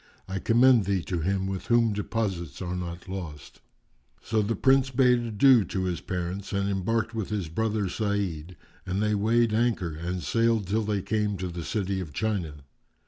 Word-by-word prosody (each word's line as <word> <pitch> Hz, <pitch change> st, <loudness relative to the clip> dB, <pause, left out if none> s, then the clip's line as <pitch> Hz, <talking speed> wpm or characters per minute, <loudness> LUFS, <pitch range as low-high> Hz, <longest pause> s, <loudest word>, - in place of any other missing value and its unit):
I 95 Hz, 0 st, -3 dB
commend 120 Hz, 0 st, +5 dB
thee 95 Hz, -2 st, 0 dB
to 90 Hz, -3 st, -2 dB
Him 95 Hz, +3 st, 0 dB
with 95 Hz, -1 st, -4 dB
Whom 115 Hz, -2 st, +3 dB
deposits 95 Hz, -8 st, -3 dB
are 90 Hz, -1 st, -3 dB
not 85 Hz, 0 st, -6 dB
lost."[FN#393] 75 Hz, -8 st, -11 dB
So 110 Hz, -1 st, +2 dB
the 110 Hz, +2 st, -1 dB
Prince 135 Hz, 0 st, +3 dB
bade 125 Hz, -1 st, +4 dB
adieu 120 Hz, +1 st, +4 dB
to 95 Hz, -, -3 dB
his 90 Hz, -3 st, -2 dB
parents 90 Hz, +2 st, -4 dB
and 100 Hz, 0 st, 0 dB
embarked, 110 Hz, +4 st, -1 dB
with 110 Hz, -5 st, -3 dB
his 100 Hz, -6 st, -2 dB
brother 105 Hz, +3 st, -1 dB
Sa'id, 90 Hz, -5 st, -2 dB, 0.3 s
and 95 Hz, +2 st, -2 dB
they 105 Hz, 0 st, +1 dB
weighed 110 Hz, +2 st, +2 dB
anchor 110 Hz, -7 st, +1 dB
and 85 Hz, +3 st, -4 dB
sailed 115 Hz, -2 st, +2 dB
till 105 Hz, +4 st, 0 dB
they 100 Hz, -3 st, -1 dB
came 105 Hz, -2 st, 0 dB
to 90 Hz, 0 st, -4 dB
the 85 Hz, -1 st, -6 dB
City 100 Hz, 0 st, -2 dB
of 80 Hz, -6 st, -6 dB
China. 85 Hz, -7 st, -2 dB
100 Hz, 180 wpm, -27 LUFS, 90-110 Hz, 0.3 s, commend